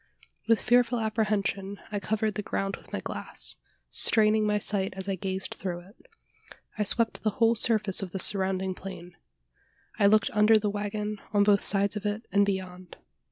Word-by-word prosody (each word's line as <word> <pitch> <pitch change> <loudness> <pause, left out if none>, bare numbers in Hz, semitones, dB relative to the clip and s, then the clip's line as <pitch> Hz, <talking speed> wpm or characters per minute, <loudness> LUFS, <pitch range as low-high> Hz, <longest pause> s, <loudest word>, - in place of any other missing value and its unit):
With 230 -1 +4
fearful 245 0 +2
apprehension, 210 -3 -2
I 205 - -2
covered 215 +1 -1
the 210 - -3
ground 195 -1 -3
with - - -18
my - - -4
glass - - -1 0.3
straining 215 -1 +4
my 210 0 +1
sight 195 -2 -1
as 190 0 -7
I 195 - -1
gazed 190 +1 -4
through 175 -2 -5
it. 200 - -21 0.7
I 215 - 0
swept 225 +2 +1
the 215 - +1
whole 230 0 +4
surface 215 -4 +1
of 195 - -5
the 190 - -5
surrounding 190 0 -1
plain. 180 -2 -10 0.8
I 200 - +5
looked 215 +1 +3
under 210 +1 +5
the 210 -1 -1
waggon 210 0 -4
on 205 -1 +4
both 200 -1 +3
sides 200 +1 +4
of 210 0 -3
it, 210 +3 -4
and 200 +1 +3
beyond. 185 -2 -5
205 Hz, 175 wpm, -27 LUFS, 195-215 Hz, 0.8 s, I